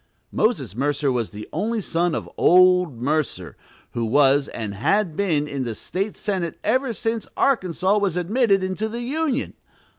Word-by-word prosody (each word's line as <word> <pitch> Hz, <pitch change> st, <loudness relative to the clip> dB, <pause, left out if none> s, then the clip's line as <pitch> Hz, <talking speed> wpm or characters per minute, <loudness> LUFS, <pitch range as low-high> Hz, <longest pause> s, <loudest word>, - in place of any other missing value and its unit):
Moses 210 Hz, -, 0 dB
Mercer 140 Hz, +2 st, 0 dB
was 120 Hz, -3 st, -1 dB
the 105 Hz, +1 st, -9 dB
only 220 Hz, +7 st, -1 dB
son 175 Hz, -3 st, 0 dB
of -, -, -4 dB
"old 180 Hz, -6 st, +4 dB
Mercer," 150 Hz, +4 st, -2 dB, 0.4 s
who 120 Hz, -, -3 dB
was, 140 Hz, +4 st, +3 dB
and 110 Hz, -3 st, -5 dB
had 175 Hz, -, 0 dB
been, 155 Hz, -7 st, 0 dB
in 140 Hz, -2 st, -3 dB
the 115 Hz, -3 st, -4 dB
State 195 Hz, -, -4 dB
Senate 190 Hz, -5 st, -3 dB
ever 255 Hz, +3 st, +1 dB
since 225 Hz, 0 st, -3 dB
Arkansas 195 Hz, -5 st, +2 dB
was 195 Hz, -4 st, 0 dB
admitted 195 Hz, +2 st, +2 dB
into 190 Hz, +4 st, -2 dB
the 235 Hz, +2 st, -5 dB
"Union." 280 Hz, +1 st, -1 dB
180 Hz, 155 wpm, -23 LUFS, 145-215 Hz, 0.4 s, old